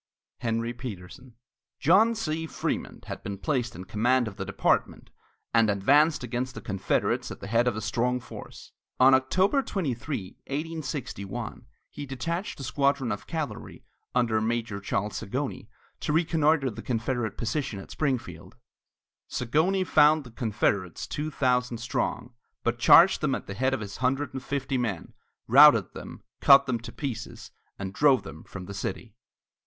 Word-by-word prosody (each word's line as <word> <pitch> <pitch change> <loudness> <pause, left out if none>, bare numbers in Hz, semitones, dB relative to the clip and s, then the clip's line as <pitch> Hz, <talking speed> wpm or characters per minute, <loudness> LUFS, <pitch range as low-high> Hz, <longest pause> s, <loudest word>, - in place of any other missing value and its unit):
HENRY 115 0 -1
PETERSON. 120 0 -9 0.4
John 215 +9 +5
C. 160 -6 -2
Frémont - - -4
had - - -6
been 100 0 -5
placed 120 0 -1
in 90 - -7
command 120 +5 +1
of 105 - -7
the 95 - -5
department 100 - 0 0.4
and 115 -2 +4
advanced 140 +10 +3
against 125 +2 -3
the - - -7
Confederates 95 -3 -1
at - - -8
the - - -8
head 115 +4 +2
of 120 - +1
a 110 - -4
strong 125 +4 0
force. - - -11 0.3
On 130 +1 +7
October 185 - +3
23, 135 - -4
1861, 145 -9 -5 0.2
he 145 - -7
detached 170 - -4
a - - -6
squadron 140 0 +1
of 105 - -5
cavalry 160 -3 -5 0.3
under 115 -3 +2
Major 115 -2 -2
Charles 100 +1 -2
Zagonyi 130 0 -4 0.3
to - - -2
reconnoitre 155 -4 +2
the - - -8
Confederate 115 -2 -2
position 120 -2 -2
at 95 - -10
Springfield. 115 - -3 0.7
Zagonyi 160 +10 +1
found 155 -1 +5
the 120 - -13
Confederates 100 -5 -1
two 155 +1 -4
thousand 125 -4 +1
strong, 120 +1 -3 0.3
but 120 0 -1
charged 170 +10 +7
them 140 -3 +1
at - - -6
the 100 - -6
head 130 +5 +1
of 125 - -6
his 100 -1 -7
hundred 130 +2 0
and 130 - -4
fifty 135 -1 -2
men, 105 -8 -3 0.3
routed 125 - +7
them, - - -9 0.2
cut 140 0 +7
them 125 -3 -1
to 120 +1 -9
pieces, 135 -5 -6 0.3
and 95 -1 -5
drove 130 +1 +4
them 80 -5 -10
from 90 -2 -9
the 100 - -8
city. 100 +3 -5
125 Hz, 155 wpm, -27 LUFS, 110-145 Hz, 0.7 s, On